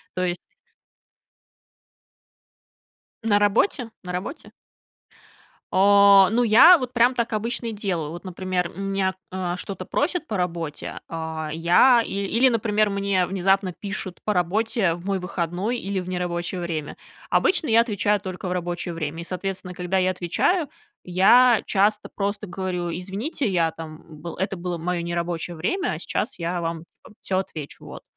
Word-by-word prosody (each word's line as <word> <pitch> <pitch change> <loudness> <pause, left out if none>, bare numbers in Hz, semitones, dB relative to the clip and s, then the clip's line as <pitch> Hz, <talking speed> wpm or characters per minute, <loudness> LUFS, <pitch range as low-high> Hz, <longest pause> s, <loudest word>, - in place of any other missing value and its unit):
То 185 - -1
есть 175 0 -1 2.9
На 215 -2 +3
работе? 230 - +2
На 180 - -6
работе? 185 - -6 1.2
Э, 200 0 +7
ну, 240 +2 +2
я 245 +11 +8
вот 255 -4 -5
прям 245 +1 +4
так 235 -2 -1
обычно 230 +2 -2
и - - -2
делаю. 180 -8 -3
Вот, 170 +1 -8
например, 185 -1 -2
у - - -9
меня, 195 -1 0 0.2
э, 180 -1 -2
что-то 185 0 -6
просят 335 +2 -1
по 210 - -3
работе, 170 -4 -4
а 160 -1 -4
я 175 +10 +5
ил 200 0 -3 0.2
или, 260 - +7
например, 215 -2 +1
мне 200 -2 +1
внезапно 195 +1 +1
пишут 190 -1 -6
по 210 - +1
работе 195 +2 +1
в 175 +1 -12
мой 195 -1 0
выходной 180 +6 -2
или 195 -3 -3
в 180 - -6
нерабочее 180 0 -3
время. 160 -4 -4 0.3
Обычно 360 -4 +2
я 230 0 +5
отвечаю 210 -3 +1
только 185 -1 -6
в - - -3
рабочее 175 0 -3
время 165 0 -4
и, - - -6
соответственно, 185 +1 -4
когда 180 +1 -2
я 185 0 +2
отвечаю, 280 - 0 0.3
я 220 +6 +5
часто 210 +1 +1
просто 205 +1 -3
говорю: 180 -1 -3
"Извините, 195 - -3
я 170 -4 +1
там 160 -1 -10 0.2
был 170 0 -6
это 190 +1 -2
было 175 0 -3
моё 175 +1 -2
нерабочее 170 0 -3
время, 350 - -1
а - - -5
сейчас - - -3
я 175 +1 -2
вам 165 -1 -3 0.2
там - - -15
всё 190 - -1
отвечу". 155 -6 -7
Вот. - - -10
185 Hz, 160 wpm, -24 LUFS, 175-210 Hz, 2.9 s, я